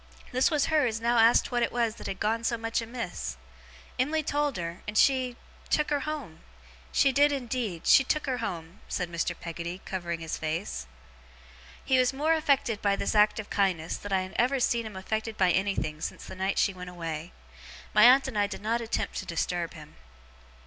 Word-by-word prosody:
This 255 +1 +3
was 300 -4 +2
her 305 -4 +3
as 225 -1 -2
now 235 +1 +2
asked 230 +3 +5
what 240 -1 +1
it 235 - +1
was 230 -2 0
that - - -7
had 195 - -4
gone 225 +2 0
so 235 0 0
much 225 +1 -1
amiss. 230 - -5 0.6
Em'ly 305 +5 +1
told 290 -3 0
her, 170 0 -5
and 210 +1 -3
she 255 -1 +3 0.3
took 300 0 +1
her 290 - +2
home. 280 - -5 0.5
She 275 - +4
did 290 +2 +4
indeed. 240 - -3
She 270 - +7
took 305 +3 -1
her 255 -3 -1
home,' 170 -5 -5
said 175 -2 -3
Mr. 170 +1 -2
Peggotty, 170 +1 -5
covering 175 -3 -3
his 160 -1 -4
face. 155 - -3 1.0
He 260 -1 +3
was 255 +1 +3
more 305 +4 +2
affected 280 -8 +1
by 200 -1 +2
this - - -1
act 210 0 +4
of 210 - -7
kindness, 180 -5 0
than 205 - -8
I 190 -1 +2
had 185 - -9
ever 260 +3 +2
seen 235 -2 +1
him 210 - -10
affected 220 +3 -3
by 185 -2 +4
anything 190 -6 -1
since - - -5
the - - -8
night 190 +1 -1
she 195 - +3
went 180 -1 -8
away. 165 -1 -5 0.6
My 215 - +7
aunt 265 +2 +7
and 230 -6 -2
I 205 - +3
did 205 - -8
not 230 +2 0
attempt 230 - -2
to - - -4
disturb 170 0 -2
him. 150 -1 -13
220 Hz, 205 wpm, -28 LUFS, 180-255 Hz, 1.0 s, She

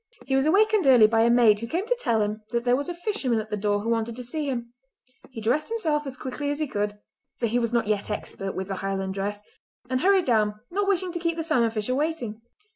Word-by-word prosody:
He 270 - -2
was 270 +2 +2
awakened 420 0 +3
early 245 -5 +8
by 225 +1 +3
a 230 - +4
maid 235 -3 +5
who 230 - -5
came 345 - -2
to - - +1
tell 225 - +1
him 210 +1 -3
that 235 -1 -1
there 245 0 +3
was 285 +5 -2
a - - -2
fisherman 345 - -1
at 215 0 -7
the - - 0
door 205 0 0
who 225 - -3
wanted 230 0 -1
to 250 - -6
see 290 +4 -2
him. 235 -2 -4 0.6
He 245 -4 -8
dressed 250 - 0
himself 310 -10 -1
as 260 -1 -6
quickly 285 +3 -4
as 290 - -1
he 310 - -1
could—for 210 0 -5
he 235 +2 +1
was 230 -1 -1
not 235 -2 +1
yet 210 0 -1
expert 195 -2 -4
with 190 0 -3
the 195 - -3
Highland 195 0 -2
dress—and 205 +5 -5
hurried 385 0 +4
down, 210 -3 +1
not 400 +2 0
wishing 370 -2 +1
to 345 - -4
keep 335 0 -1
the 325 - -1
salmon 255 -8 +2
fisher 220 +2 -2
waiting. 265 -7 -2
240 Hz, 245 wpm, -25 LUFS, 215-310 Hz, 0.6 s, early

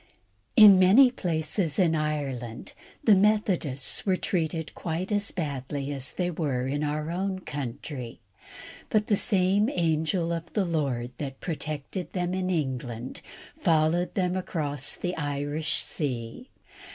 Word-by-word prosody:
In 205 -3 +9
many 220 +8 +7
places 160 - -1
in 175 -4 +3
Ireland 140 -7 -3 0.3
the 220 - +6
Methodists 190 -9 +2
were 190 -2 +2
treated 160 -3 -2
quite 175 +4 -4
as 205 -1 +1
badly 140 -3 -4
as 135 -2 -1
they 180 -1 -1
were 140 -7 -1
in 145 +3 -1
our 150 +2 -2
own 190 +2 -2
country; 135 -3 -6 0.7
but 215 -1 +2
the 210 - +2
same 200 +1 +2
angel 165 - 0
of 165 0 -6
the 205 -3 +1
Lord 135 -8 -1
that 135 -2 -5
protected 155 +1 -5
them 180 -1 -1
in 185 0 -1
England 130 -7 -3 0.3
followed 165 +2 +1
them 180 -2 0
across 150 -6 -1
the 180 0 -3
Irish 145 +1 -1
sea. 130 - -4
160 Hz, 130 wpm, -27 LUFS, 140-185 Hz, 0.7 s, In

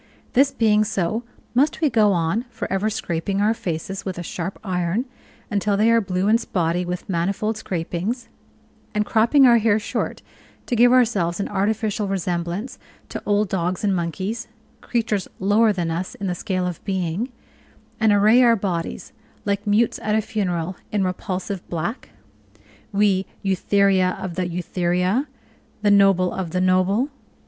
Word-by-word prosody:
This 270 +2 +5
being 215 -2 +3
so, 215 +1 -1 0.3
must 280 +5 +2
we 315 - +3
go 215 -6 +4
on 175 +6 0
for - - -5
ever 200 +3 +1
scraping 195 -2 -2
our 210 +2 +3
faces 190 -1 -4
with 190 -2 -4
a 175 - -4
sharp 175 +2 -5
iron, 185 +4 -1 0.5
until 205 0 +1
they 220 +3 +4
are 230 0 +4
blue 185 -1 -1
and 225 +3 +4
spotty 175 -4 0
with 180 0 -5
manifold 195 +5 -1
scrapings; 200 +4 -3 0.7
and 210 0 +1
cropping 235 +7 +4
our 235 -2 +6
hair 215 -1 +3
short 215 - -3 0.4
to 245 - -1
give 245 +1 +6
ourselves 210 -9 +2
an 200 - -1
artificial 210 +1 0
resemblance 180 +3 -3 0.3
to - - -5
old 205 0 +2
dogs 180 0 -1
and 200 -2 +2
monkeys 185 +7 -3 0.3
creatures 220 -5 -1
lower 210 +3 +4
than 175 -4 -2
us 175 +3 -3
in 200 - -5
the 180 - 0
scale 185 0 -2
of 180 -3 -5
being 190 +4 -2 0.7
and 220 -1 +4
array 210 +4 +5
our 235 -2 +6
bodies, 185 -5 -3 0.3
like 200 +1 -1
mutes 215 +3 +2
at 210 0 0
a 220 - +3
funeral, 180 -5 -2 0.2
in 205 -2 +1
repulsive 185 +1 -3
black 175 +9 -4 0.8
we, 200 -2 +2 0.2
"Eutheria 195 -1 +2
of 185 -2 -4
the 180 0 -1
Eutheria, 180 - 0 0.6
the 205 - +4
noble 195 -3 +4
of 185 -3 -3
the 180 - +1
noble?" 185 +8 +2
195 Hz, 155 wpm, -22 LUFS, 180-220 Hz, 0.8 s, our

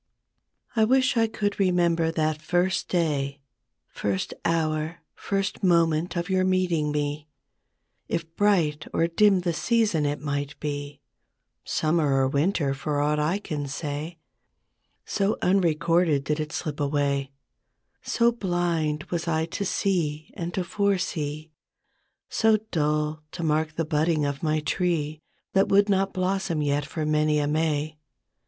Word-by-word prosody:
T 220 - +3
WISH 260 +3 +3
I 225 -1 +3
could 205 -2 -2
remember 175 -3 +2
that 155 -1 -1
first 175 +3 0
day, 150 -6 0
" - - -27
L 145 - -35 0.6
First 100 -2 -1
hour, 160 0 -1
first 195 0 -2
moment 170 -2 +2
of 170 0 -1
your 185 -1 +2
meeting 180 -5 +1
me; 145 0 -2 0.8
It 165 0 -4
bright 165 -8 +2
or 165 - +3
dim 190 +3 +4
the 175 -1 -1
season, 210 -6 +1
it 145 +1 -2
might 145 -1 -3
be 145 -1 -5 0.6
Summer 155 -3 +1
or 135 -1 +3
Winter 145 0 +1
for 145 +2 -2
aught 150 +1 +1
I 155 +6 +1
can 150 -8 -4
say; 150 +3 -4 0.9
So 200 0 0
unrecorded 170 -4 +2
did 150 +2 -1
it 155 0 -3
slip 155 -3 -4
away, 140 -1 0 0.7
So 235 0 +2
blind 175 -7 -1
was 170 -1 -2
I 160 -1 +1
to 170 +4 -4
see 165 -6 -1
and 170 0 -4
to 185 - 0
foresee 165 -6 -1 0.4
— - - -47
So 220 -1 +3
dull 150 -1 0
to 170 - -5
mark 155 0 0
the 165 - -1
budding 155 0 +1
of 140 -1 -3
my 155 -1 +1
tree 155 -2 -1 0.3
That 195 0 +3
would 200 +1 +4
not 195 0 +2
blossom 185 -4 -1
yet 145 0 0
for 155 -1 -3
many 150 0 +2
a 145 - +1
May. 155 0 -1
160 Hz, 145 wpm, -26 LUFS, 150-180 Hz, 0.9 s, dim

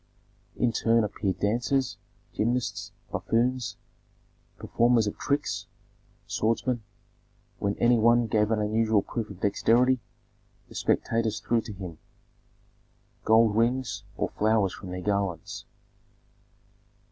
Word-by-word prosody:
In 120 - +1
turn 115 0 +2
appeared 100 -2 -2
dancers, 120 +2 0 0.3
gymnasts, 120 +3 -1 0.2
buffoons, 120 0 0 0.8
performers 120 -1 +2
of 105 - -3
tricks, 145 +1 -1 0.6
swordsmen; 115 +2 0 0.8
when 100 0 -1
any 120 0 +4
one 120 +1 +4
gave 105 -1 +1
an 110 - +2
unusual 110 0 +2
proof 115 -2 -4
of 95 -2 -11
dexterity, 120 +5 +3 0.7
the - - -13
spectators 115 -2 0
threw 115 +1 +1
to 110 - -8
him 90 -5 -8 1.3
gold 110 -1 +5
rings 115 -2 0
or - - -1
flowers 105 -3 +1
from 95 - -9
their 90 0 -5
garlands. 100 -3 -2
115 Hz, 110 wpm, -27 LUFS, 105-120 Hz, 1.3 s, gold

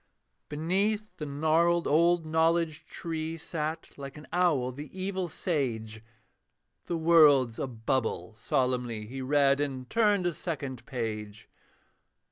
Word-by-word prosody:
Beneath 195 +8 -1
the 150 - -5
gnarled 160 +4 +2
old 170 +2 +3
Knowledge 160 0 +1
tree 160 -1 -4
Sat, 160 0 -4
like 140 0 -8
an 150 - -11
owl, 160 -8 +2
the 145 +4 -8
evil 190 -1 -2
sage: 115 - -2 0.8
'The 170 - -2
World's 150 -8 +5
a - - -1
bubble,' 115 -5 -2
solemnly 120 -1 -1
He 130 +5 -6
read, 140 +1 +3
and 135 -3 -3
turned 210 -5 +3
a 175 - +1
second 135 -8 -5
page. 110 -4 -5
150 Hz, 120 wpm, -29 LUFS, 130-170 Hz, 0.8 s, World's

